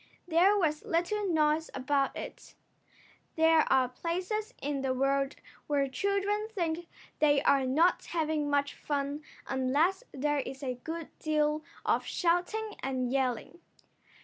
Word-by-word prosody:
There 360 +5 +5
was 310 -5 0
little 375 +5 0
noise 310 0 +2
about 275 +1 0
it. - - -8 0.8
There 320 0 +4
are 260 -1 +4
places 365 - -3
in 280 -1 -2
the 260 -1 0
world 275 +1 +1 0.3
where 285 -2 +2
children 400 +7 0
think 345 -5 -2 0.3
they 290 -2 +5
are 270 -2 +3
not 325 +7 +3
having 310 -3 -1
much 285 0 +1
fun 285 0 -3 0.2
unless 285 - +1
there 295 +2 0
is 270 +1 -6
a 255 -2 -1
good 325 0 -5
deal 305 0 +1 0.2
of - - +2
shouting 380 +5 0
and 255 -2 -1
yelling. 265 +4 -1
305 Hz, 130 wpm, -30 LUFS, 275-345 Hz, 0.8 s, There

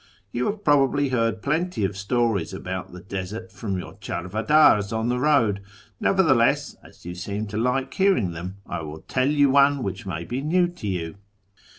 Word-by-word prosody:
You 120 +3 -1
have 210 0 -3
probably 145 -2 +3
heard 115 -3 0
plenty 160 - 0
of 95 - -3
stories 105 -2 0
about 95 0 -5
the 90 0 -10
desert 95 0 -6
from 100 -1 -4
your 90 - -7
cltarvaddrs 105 - +2
on 110 +1 -1
the 125 0 0
road; 120 -9 +3 0.4
nevertheless, 145 -12 +3
as - - -18
you 90 - -5
seem 100 +4 -4
to 105 - -4
like 125 +3 0
hearing 190 - +2
them, 90 +3 -6
I - - -4
will 80 0 -8
tell 130 +1 0
you 145 -2 +4
one 140 -1 +4
which 95 +2 -5
may 85 -3 -3
be 125 +7 -3
new 175 +4 +2
to 175 -12 -8
you." 85 -3 -3
115 Hz, 180 wpm, -24 LUFS, 95-140 Hz, 0.4 s, you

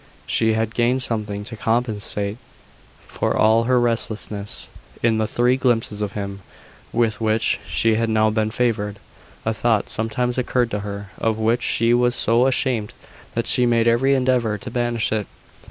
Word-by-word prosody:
She 110 -1 +2
had 110 0 -1
gained 125 +2 +2
something 105 -3 -3
to 115 +2 -8
compensate 110 -2 -1 0.7
for - - -1
all 110 +1 +4
her 125 0 +3
restlessness, 110 -3 -1 0.4
in 115 -1 +3
the 110 - 0
three 125 +3 +2
glimpses 115 -5 0
of 100 -1 -3
him 100 -1 -5 0.5
with 115 -2 0
which 110 0 +1
she 115 -1 +2
had 115 +1 0
now 110 0 +3
been 110 0 0
favoured. 110 -3 -1 0.5
A 110 - +1
thought 110 -1 0
sometimes 125 +3 -1
occurred 125 -1 0
to 105 - -1
her, 100 -1 -7
of 110 -1 0
which 115 +2 +1
she 115 0 +2
was 120 0 +2
so 120 +3 +3
ashamed 125 -5 0 0.4
that - - 0
she 125 -1 +4
made 115 -1 +2
every 130 +4 +3
endeavour 125 -5 +1
to 125 +2 -8
banish 120 -2 0
it. 110 -2 -1
115 Hz, 165 wpm, -21 LUFS, 110-120 Hz, 0.7 s, all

